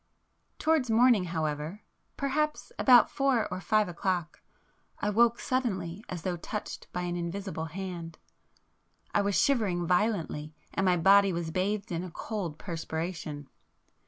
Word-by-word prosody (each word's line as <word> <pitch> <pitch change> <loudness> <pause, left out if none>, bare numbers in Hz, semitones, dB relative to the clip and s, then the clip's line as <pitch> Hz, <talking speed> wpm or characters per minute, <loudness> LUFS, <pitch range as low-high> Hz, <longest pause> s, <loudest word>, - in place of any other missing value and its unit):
Towards 310 -6 +2
morning 225 -3 +5
however, 160 +2 -3 0.3
perhaps 300 +2 -1
about 245 -3 +7
four 270 -5 +2
or 185 - -4
five 215 0 +2
o'clock, 175 -1 -2 0.6
I 210 - -1
woke 235 +2 +4
suddenly 205 -7 -2
as 175 -3 -5
though 180 -2 -1
touched 210 +5 -6
by 180 - -3
an 175 0 -2
invisible 175 0 -4
hand. 170 -1 -6 1.0
I 205 - +3
was 200 -1 +1
shivering 205 -10 +2
violently, 170 -5 0 0.2
and 195 - 0
my 180 -1 +4
body 195 +3 +6
was 170 -2 -3
bathed 195 +3 -1
in 170 0 -2
a 185 - -6
cold 175 -3 -4
perspiration. 160 -4 -5
185 Hz, 135 wpm, -29 LUFS, 170-215 Hz, 1.0 s, about